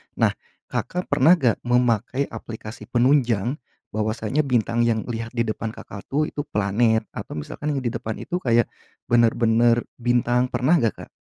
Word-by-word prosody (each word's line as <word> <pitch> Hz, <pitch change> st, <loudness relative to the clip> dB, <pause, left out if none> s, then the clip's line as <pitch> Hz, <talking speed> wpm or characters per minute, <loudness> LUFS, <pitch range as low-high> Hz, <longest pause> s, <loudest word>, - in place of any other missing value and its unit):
nah -, -, +3 dB, 0.4 s
Kakak, 180 Hz, 0 st, -3 dB
pernah 170 Hz, +3 st, +6 dB
enggak 125 Hz, -10 st, +1 dB
memakai 125 Hz, +2 st, +1 dB
aplikasi 110 Hz, 0 st, -8 dB
penunjang, 125 Hz, -1 st, +2 dB, 0.3 s
bahwasanya 110 Hz, +4 st, -1 dB
bintang 120 Hz, -4 st, +2 dB
yang 110 Hz, -2 st, +1 dB
lihat 115 Hz, 0 st, -5 dB
di 115 Hz, -, +2 dB
depan 110 Hz, 0 st, -3 dB
Kakak, 100 Hz, 0 st, -10 dB
tuh 145 Hz, +3 st, +1 dB
itu 145 Hz, 0 st, -5 dB
planet 110 Hz, +2 st, +2 dB
atau -, -, -7 dB
misalkan 145 Hz, -, -4 dB
yang 135 Hz, -, -2 dB
di 120 Hz, -, 0 dB
depan 110 Hz, -1 st, -4 dB
itu 180 Hz, -, -2 dB
kayak, 120 Hz, -6 st, +2 dB, 0.4 s
bener-bener 120 Hz, 0 st, +4 dB, 0.2 s
bintang 120 Hz, +1 st, +2 dB
pernah 145 Hz, +7 st, +2 dB
nggak 115 Hz, -5 st, +1 dB
Kak? -, -, -11 dB
120 Hz, 155 wpm, -23 LUFS, 110-130 Hz, 0.4 s, pernah